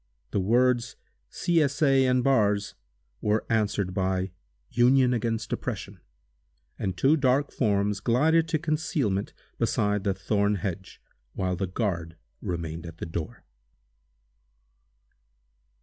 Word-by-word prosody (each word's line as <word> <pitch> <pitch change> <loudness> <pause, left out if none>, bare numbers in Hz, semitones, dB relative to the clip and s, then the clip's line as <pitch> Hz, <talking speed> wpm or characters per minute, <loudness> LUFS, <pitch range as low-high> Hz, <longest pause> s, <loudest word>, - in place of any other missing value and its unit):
The - - 0
words 120 +4 +2 0.3
"C. 170 -2 +1
S. 140 -1 0
A. 135 -2 +4
and 125 -1 +2
Bars" 105 -6 +2 0.5
were 105 +1 +1
answered 105 -4 0
by 95 0 -1 0.4
"Union 125 +1 +4
against 115 -1 -2
Oppression," 100 -5 -5 0.8
and 95 -2 -2
two 140 - +4
dark 135 -1 +2
forms 100 -3 +1
glided 160 +9 +3
to 165 -1 +1
concealment 150 - -1 0.3
beside 105 -1 +1
the 95 -1 0
thorn 100 +1 +1
hedge, 95 0 -5 0.3
while 90 -1 -1
the 95 +2 -2
guard 85 -4 -2 0.3
remained 85 -3 -4
at 85 0 -10
the - - -5
door. 80 -1 -6
105 Hz, 120 wpm, -27 LUFS, 95-130 Hz, 0.8 s, A